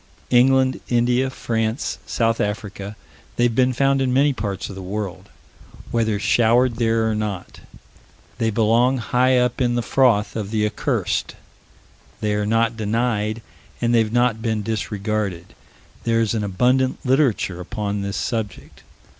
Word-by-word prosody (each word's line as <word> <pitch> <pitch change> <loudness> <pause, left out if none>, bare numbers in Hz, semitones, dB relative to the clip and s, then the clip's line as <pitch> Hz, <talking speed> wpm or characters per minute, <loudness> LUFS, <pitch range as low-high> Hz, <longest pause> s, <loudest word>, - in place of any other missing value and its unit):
England, 130 +1 +4
India, 125 +2 +2
France, 115 0 -2
South 115 -1 0
Africa 105 -1 -4 0.4
they've 120 -1 +2
been 130 +2 +3
found 135 +2 +2
in 130 -1 +1
many 140 +3 +3
parts 100 -5 -4
of - - -8
the 95 - -8
world 95 -1 -5 0.6
whether 110 -3 +1
showered 115 +3 +3
there 115 -1 +1
or 110 - 0
not. 105 -4 -4 0.8
They 115 -1 +1
belong 115 +4 +3
high 125 +2 +2
up 125 +1 +1
in 120 -1 +2
the 120 - 0
froth 115 -6 +2
of 105 -3 -3
the 110 -1 0
accursed: 105 - -1 0.8
they 105 -1 0
are 105 0 -1
not 115 +1 +2
denied, 110 0 -1 0.4
and 120 0 +1
they 115 - +5
have 110 -1 0
not 120 -2 +2
been 110 -2 -1
disregarded; 105 -4 -3 0.5
there 115 0 +1
is 115 -1 +1
an 110 -2 -1
abundant 125 +8 +1
literature 125 - +1
upon 100 +2 -3
this 100 0 -3
subject. 110 -6 -4
115 Hz, 145 wpm, -21 LUFS, 105-125 Hz, 0.8 s, they